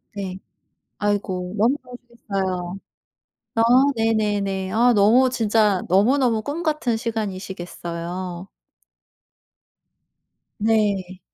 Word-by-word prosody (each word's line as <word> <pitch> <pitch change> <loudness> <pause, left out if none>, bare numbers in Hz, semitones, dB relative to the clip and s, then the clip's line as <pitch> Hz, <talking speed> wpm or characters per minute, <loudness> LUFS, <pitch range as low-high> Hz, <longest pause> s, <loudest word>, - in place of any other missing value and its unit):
네. 190 -2 -5 0.6
아이고 195 -2 -2
너무 235 +6 +3
좋으시겠어요. 195 -7 -5 0.8
아 225 - +3 0.3
네네네. 205 -4 0
아 240 +2 +4
너무 230 +6 +5
진짜 215 -5 +2
너무너무 225 +5 +3
꿈같은 300 -4 -1
시간이시겠어요. 185 -4 -5 2.1
네. 205 -4 0
205 Hz, 190 characters per minute, -22 LUFS, 185-230 Hz, 2.1 s, 너무